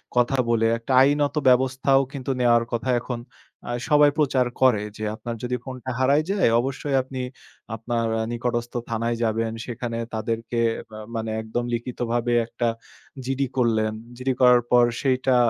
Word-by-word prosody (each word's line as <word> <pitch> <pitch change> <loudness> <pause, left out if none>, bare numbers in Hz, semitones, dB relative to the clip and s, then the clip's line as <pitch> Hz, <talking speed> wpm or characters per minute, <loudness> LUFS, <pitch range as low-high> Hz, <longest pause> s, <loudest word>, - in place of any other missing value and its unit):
কথা 125 +2 +2
বলে, 115 -1 +2
একটা 115 +3 -3
আইনত 145 +2 +2
ব্যবস্থাও 130 +2 +3
কিন্তু 135 -1 -3
নেওয়ার 120 -1 +4
কথা 120 +2 -2
এখন 120 0 -5 0.4
অ্যা - - -5 0.2
সবাই 150 -1 +6
প্রচার 135 -4 +2 0.2
করে। 115 -6 +4
যে, 110 - -6
"আপনার 120 +1 -6
যদি 125 0 -1
ফোনটা 130 -1 -6
হারায় 140 +4 +3
যায়? 195 - +3
অবশ্যই 135 +1 -2
আপনি 130 0 -6 0.5
আপনার 115 +1 -2
এ - - 0
নিকটস্থ 120 0 -2 0.2
থানায় 115 +1 -1
যাবেন। 115 0 0
সেখানে 120 -1 -4 0.2
তাদেরকে 115 +1 -2 0.3
বা 110 0 -9 0.2
মানে 110 -1 -2
একদম 110 +2 -3
লিখিতভাবে 120 0 -1
একটা 120 0 -2 0.6
জিডি 135 0 -1
করলেন। 110 -3 +2 0.2
জিডি 130 +1 -1
করার 125 -1 +7
পর 120 0 +6 0.2
সেইটা" 130 -1 +2
120 Hz, 150 wpm, -24 LUFS, 115-130 Hz, 0.6 s, করার